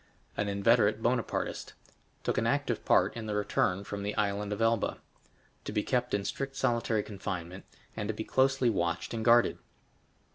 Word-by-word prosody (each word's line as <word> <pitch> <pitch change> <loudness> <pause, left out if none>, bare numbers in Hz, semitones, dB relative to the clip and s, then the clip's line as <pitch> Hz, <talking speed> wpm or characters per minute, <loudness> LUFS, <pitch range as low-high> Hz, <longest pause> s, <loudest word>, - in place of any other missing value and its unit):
An 100 0 -1
inveterate 105 +2 +3
Bonapartist; 120 0 -1 0.5
took - - 0
an - - 0
active - - 0
part - - +3
in 115 -2 -5
the 105 - -2
return 100 -2 0
from 100 0 -5
the 105 +1 -3
Island 100 0 -1
of 105 - -3
Elba. 115 -1 +1 0.7
To - - -4
be 105 - 0
kept 125 -2 0
in 100 -1 -2
strict 135 +4 -3
solitary 115 -5 +1
confinement, 95 -3 -6 0.3
and 105 - -3
to 110 - -1
be 110 - -3
closely 130 0 +2
watched 85 -2 -1
and 115 -1 -2
guarded. 120 +1 +4
105 Hz, 170 wpm, -30 LUFS, 100-120 Hz, 0.7 s, guarded